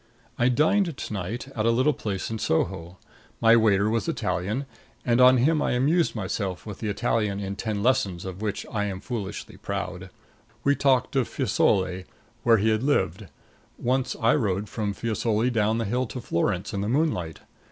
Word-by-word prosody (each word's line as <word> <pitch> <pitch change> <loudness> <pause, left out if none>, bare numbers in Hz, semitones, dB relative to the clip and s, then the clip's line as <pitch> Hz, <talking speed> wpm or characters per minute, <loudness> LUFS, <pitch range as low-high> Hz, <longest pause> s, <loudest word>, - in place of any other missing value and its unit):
I 120 +1 +4
dined 160 +5 +2
to - - -5
night 105 +7 -4
at 115 -4 -1
a - - +5
little 130 +6 +3
place 100 -3 -4
in 110 - -3
Soho. 85 +1 -1 0.4
My 115 0 +6
waiter 105 -3 +4
was 110 -3 0
Italian, 95 +9 -2 0.4
and 120 +1 +3
on 130 +1 +7
him 150 +5 +3
I - - +1
amused 150 +7 +2
myself 95 -2 -3
with 105 -3 -7
the 110 - -2
Italian 100 0 0
in 100 0 -4
Ten 105 -1 -3
Lessons 100 -8 +1
of 95 +1 -7
which 105 -2 -3
I 105 -2 -1
am 95 -2 -4
foolishly 105 -2 -6
proud. - - -5 0.5
We 140 0 +3
talked 135 -2 +2
of 130 -4 +2
Fiesole, 95 -1 +1 0.4
where 115 -1 +5
he 110 +2 +2
had 110 0 +1
lived. 95 - 0 0.5
Once 130 +1 0
I 115 0 +4
rode 105 -6 0
from 105 -1 -3
Fiesole 115 +2 0
down 110 -1 +1
the 115 - -1
hill 125 +5 -1
to 125 - -6
Florence 90 -2 -1
in 100 - -2
the 105 - -2
moonlight. 120 - 0
110 Hz, 180 wpm, -25 LUFS, 100-125 Hz, 0.5 s, on